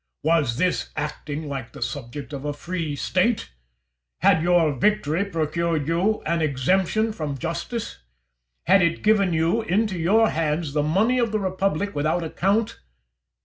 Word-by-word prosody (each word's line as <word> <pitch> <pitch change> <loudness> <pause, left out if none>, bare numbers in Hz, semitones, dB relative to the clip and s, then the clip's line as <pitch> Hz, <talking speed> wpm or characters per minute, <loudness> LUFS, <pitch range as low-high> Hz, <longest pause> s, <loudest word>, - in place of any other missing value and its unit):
Was 150 -7 +2
this 180 +2 0
acting 150 0 -4
like 135 -4 -6
the - - -11
subject 140 +2 -6
of 140 -1 -5
a 145 0 -2
free 165 -1 -4
State? 195 +9 0 0.7
Had 160 - +4
your 170 -3 +3
victory 170 +3 +1
procured 165 -3 -1
you 185 +6 +1
an 170 +1 0
exemption 185 - +1
from 150 -7 -4
justice? 170 - -4 0.7
Had 190 +3 +5
it 170 -1 +1
given 205 -3 +3
into 190 +3 +1
your 220 +7 +4
hands 155 -1 -1
the 150 - +2
money 200 +12 +2
of 235 -3 +1
the 215 - +1
republic 195 0 -1
without 155 +4 0
account? 200 +7 0
170 Hz, 145 wpm, -24 LUFS, 150-195 Hz, 0.7 s, Had